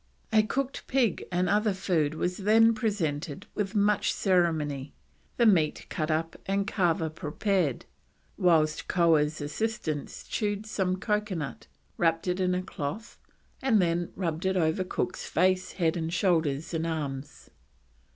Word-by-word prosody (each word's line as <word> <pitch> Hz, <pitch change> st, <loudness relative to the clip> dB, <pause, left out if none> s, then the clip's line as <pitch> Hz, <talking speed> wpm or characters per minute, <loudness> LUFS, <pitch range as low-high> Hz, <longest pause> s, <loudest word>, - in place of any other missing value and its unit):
A 215 Hz, -, +7 dB
cooked 265 Hz, +5 st, -3 dB
pig 250 Hz, -8 st, +1 dB
and 180 Hz, +1 st, +1 dB
other 210 Hz, +1 st, +2 dB
food 160 Hz, -5 st, 0 dB
was 180 Hz, +3 st, -1 dB
then 225 Hz, +3 st, +5 dB
presented 180 Hz, -, -2 dB
with 210 Hz, 0 st, -3 dB
much 205 Hz, 0 st, +3 dB
ceremony, 155 Hz, -7 st, 0 dB, 0.4 s
the 235 Hz, -, +4 dB
meat 165 Hz, -8 st, +3 dB
cut 155 Hz, 0 st, -2 dB
up 160 Hz, +1 st, -1 dB
and 195 Hz, +1 st, +1 dB
kava 170 Hz, -6 st, +1 dB
prepared; 160 Hz, -, -1 dB, 0.5 s
whilst 160 Hz, -5 st, +2 dB
Koah's 160 Hz, -3 st, +3 dB
assistant 155 Hz, -1 st, -3 dB
chewed 205 Hz, -1 st, -2 dB
some 190 Hz, -4 st, 0 dB
coconut, 205 Hz, -7 st, -2 dB, 0.3 s
wrapped 165 Hz, +1 st, +1 dB
it 180 Hz, +1 st, 0 dB
in 180 Hz, -1 st, +1 dB
cloth, 185 Hz, +5 st, -6 dB, 0.4 s
and 250 Hz, -5 st, +3 dB
then 175 Hz, -1 st, 0 dB
rubbed 170 Hz, -1 st, -2 dB
it 190 Hz, 0 st, +1 dB
over 160 Hz, +1 st, +1 dB
Cook's 180 Hz, 0 st, -3 dB
face, 185 Hz, 0 st, +1 dB
head, 165 Hz, -2 st, 0 dB
shoulders, 165 Hz, -5 st, +1 dB
and 165 Hz, 0 st, -1 dB
arms. 145 Hz, -4 st, -5 dB
180 Hz, 130 wpm, -28 LUFS, 160-205 Hz, 0.5 s, A